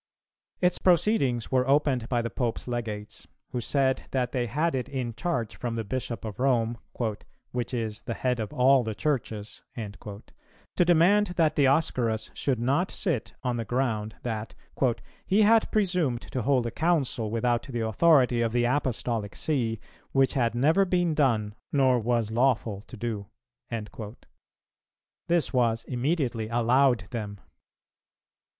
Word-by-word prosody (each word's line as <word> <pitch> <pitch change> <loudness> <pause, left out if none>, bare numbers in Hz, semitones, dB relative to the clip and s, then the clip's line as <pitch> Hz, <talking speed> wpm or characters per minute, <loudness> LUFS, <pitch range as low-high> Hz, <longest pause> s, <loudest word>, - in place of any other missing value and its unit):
[308:2] - - +7
Its 180 - -1
proceedings 170 - +2
were 130 0 +2
opened 135 -4 +2
by 120 -2 +1
the 115 - -3
Pope's 120 -1 -2
Legates, 110 -4 -5 0.2
who 125 - -2
said 130 +1 +1
that 125 -2 -1
they 125 -2 -1
had 155 +9 0
it 130 -2 -2
in 125 -4 -3
charge 115 -3 -2
from 120 -2 -4
the 115 - -2
Bishop 115 0 -4
of 110 0 -6
Rome, 120 -3 +1 0.7
"which 120 -1 -3
is 110 -3 -3
the 115 - -4
head 125 -2 -1
of 110 - -3
all 135 -2 +4
the 110 -2 -4
Churches," 110 -8 -3 0.2
to 105 - -6
demand 180 +5 +5
that 155 -3 +2
Dioscorus 130 -6 +1
should 135 -3 -1
not 140 +10 +1
sit, 165 - -2
on 125 -2 -1
the 115 - -2
ground 110 -2 -1
that 110 -2 -4 0.7
"he 205 +3 +4
had 225 +1 +4
presumed 175 - +1
to 130 - -4
hold 130 0 +2
a 115 - -2
Council 140 -7 0
without 120 +2 +1
the 120 -2 -4
authority 125 0 +4
of 115 -1 0
the 120 0 +2
Apostolic 120 -5 -1
See, 120 -8 -1 0.3
which 135 -1 +3
had 120 -3 +1
never 155 +10 +4
been 175 -3 +1
done 115 -8 +1 0.2
nor 130 -3 +3
was 115 -1 0
lawful 115 -4 +1
to 125 - -10
do."[308:3] 110 0 -7 1.1
This 170 -3 +1
was 115 -3 +2
immediately 125 -4 -1
allowed 120 +1 +3
them. 105 -4 -5
125 Hz, 145 wpm, -27 LUFS, 115-140 Hz, 1.1 s, 308:2